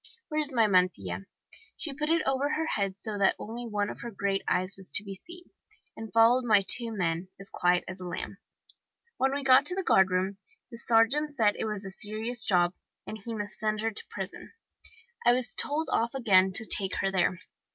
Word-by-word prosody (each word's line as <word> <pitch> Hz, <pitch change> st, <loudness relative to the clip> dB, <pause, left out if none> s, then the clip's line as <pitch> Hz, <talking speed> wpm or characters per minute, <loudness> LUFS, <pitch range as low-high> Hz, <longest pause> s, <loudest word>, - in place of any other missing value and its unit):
Where 305 Hz, -1 st, -1 dB
is 295 Hz, -1 st, -2 dB
my 230 Hz, -4 st, +3 dB
mantilla?' 135 Hz, -, 0 dB, 0.5 s
She 300 Hz, -, -4 dB
put 300 Hz, +2 st, -3 dB
it 330 Hz, 0 st, +2 dB
over 270 Hz, +2 st, 0 dB
her 320 Hz, +1 st, -1 dB
head 200 Hz, -10 st, -2 dB
so 205 Hz, 0 st, -5 dB
that 195 Hz, -, +3 dB
only 235 Hz, +3 st, -7 dB
one 205 Hz, -2 st, -1 dB
of -, -, -8 dB
her 235 Hz, -, -6 dB
great 195 Hz, -2 st, -2 dB
eyes 185 Hz, +2 st, +1 dB
was 190 Hz, -2 st, -3 dB
to 210 Hz, -, +3 dB
be 200 Hz, -1 st, -7 dB
seen, 345 Hz, -, -13 dB, 0.4 s
and 225 Hz, -1 st, -8 dB
followed 230 Hz, +3 st, +5 dB
my 210 Hz, -4 st, +4 dB
two 235 Hz, +2 st, +4 dB
men, 175 Hz, -3 st, -2 dB
as 195 Hz, -, -6 dB
quiet 180 Hz, 0 st, +1 dB
as 185 Hz, 0 st, -7 dB
a 180 Hz, -, -7 dB
lamb. 180 Hz, +3 st, -6 dB, 0.8 s
When 265 Hz, +1 st, +1 dB
we 280 Hz, 0 st, -3 dB
got 260 Hz, 0 st, +6 dB
to 360 Hz, -, +8 dB
the 385 Hz, -, -2 dB
guardroom 190 Hz, -, +2 dB, 0.3 s
the 235 Hz, -, -9 dB
sergeant 255 Hz, +7 st, +2 dB
said 215 Hz, -5 st, +2 dB
it -, -, -3 dB
was 210 Hz, -2 st, -4 dB
a 195 Hz, -, -7 dB
serious 220 Hz, +4 st, -4 dB
job, 175 Hz, -4 st, +2 dB, 0.3 s
and 220 Hz, -, -7 dB
he 230 Hz, -2 st, -5 dB
must 205 Hz, -2 st, -6 dB
send 215 Hz, 0 st, -1 dB
her 225 Hz, 0 st, -1 dB
to 210 Hz, -, -2 dB
prison. -, -, -8 dB, 0.7 s
I 240 Hz, -, +5 dB
was 245 Hz, -3 st, +2 dB
told 310 Hz, +2 st, -1 dB
off 235 Hz, +3 st, 0 dB
again 190 Hz, -7 st, +4 dB
to 220 Hz, -, +3 dB
take 195 Hz, -3 st, 0 dB
her 195 Hz, -, 0 dB
there. 185 Hz, -1 st, +1 dB
215 Hz, 210 wpm, -28 LUFS, 190-245 Hz, 0.8 s, to